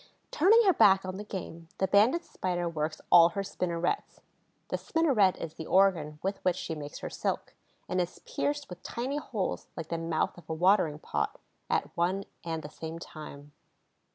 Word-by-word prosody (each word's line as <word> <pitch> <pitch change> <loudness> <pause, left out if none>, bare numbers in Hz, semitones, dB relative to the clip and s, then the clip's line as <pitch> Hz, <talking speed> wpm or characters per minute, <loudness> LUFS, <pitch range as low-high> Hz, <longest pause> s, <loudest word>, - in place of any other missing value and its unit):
Turning 435 +9 +6
her 380 - +6
back 195 - +5
on 185 0 -4
the 205 - -5
game, 170 -5 -7
the 190 - +1
Banded 220 - +4
Spider 175 -2 -2
works 155 -1 -3
all 170 0 +9
her 200 +3 -3
spinnerets—the 180 - -4
spinneret 265 - +3
is 160 - -6
the 160 - -8
organ 175 -6 +3
with 195 +1 -2
which 180 -2 +2
she 175 - -4
makes 145 -2 -7
her - - -4
silk, - - -3 0.3
and 185 0 +1
is 175 0 -4
pierced 290 0 -2
with 180 -1 -10
tiny 260 +5 -3
holes 220 -9 -3
like 165 -2 -5
the 170 - -2
mouth 165 -1 -1
of 175 - -19
a 160 - -1
watering 170 -3 +3
pot—at 75 - -3
one 185 +3 +1 0.2
and 165 -1 -3
the 150 - -7
same 160 +1 -6
time. 150 -3 -10
180 Hz, 175 wpm, -30 LUFS, 165-200 Hz, 0.3 s, all